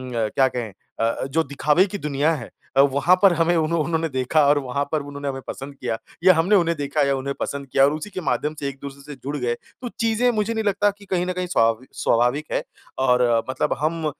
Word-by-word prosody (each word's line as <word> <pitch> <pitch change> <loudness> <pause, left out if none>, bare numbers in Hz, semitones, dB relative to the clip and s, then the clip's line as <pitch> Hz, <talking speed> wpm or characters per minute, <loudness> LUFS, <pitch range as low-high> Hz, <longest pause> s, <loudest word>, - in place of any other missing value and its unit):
क्या 115 +4 +2
कहें 120 -5 -4 0.3
अ, 115 +2 0
जो 155 +5 0
दिखावे 150 +6 +2
की 205 - -5
दुनिया 150 -1 0
है 120 - -8 0.3
अ, - - +8
वहाँ 140 +6 +4
पर 195 -3 +6
हमें 170 +1 +2
उन्हों 160 0 +1
उन्होंने 165 0 -1
देखा 130 +3 +2
और 145 +1 +4
वहाँ 135 +1 -2
पर 155 - 0
उन्होंने 145 0 -7
हमें 135 -1 -3
पसंद 140 +1 -7
किया। 115 - -3 0.3
या 185 0 +8
हमने 180 +6 +3
उन्हें 170 -3 +2
देखा 145 +1 -1
या 140 - +2
उन्हें 140 +1 -3
पसंद 140 -1 -4
किया 135 +1 +3
और 145 - +2
उसी 155 +6 -5
के 185 - -6
माध्यम 150 0 -1
से 140 - -3
एक-दूसरे 140 +1 -9
से 145 0 -9
जुड़ 145 +3 -3
गए। 120 -3 -1 0.3
तो 245 - -4
चीज़ें 230 +2 +2
मुझे 220 0 -1
नहीं 220 -1 -1
लगता 205 0 +2
कि 200 - -15
कहीं 180 -2 -1
न 185 - -2
कहीं 180 0 -3
स्वविक 115 -4 +1
स्वाभाविक 125 +6 +2
है। - - 0 0.4
और 125 0 +4 0.3
मतलब 130 - 0
हम 160 +1 -1
145 Hz, 230 wpm, -22 LUFS, 135-175 Hz, 0.4 s, अ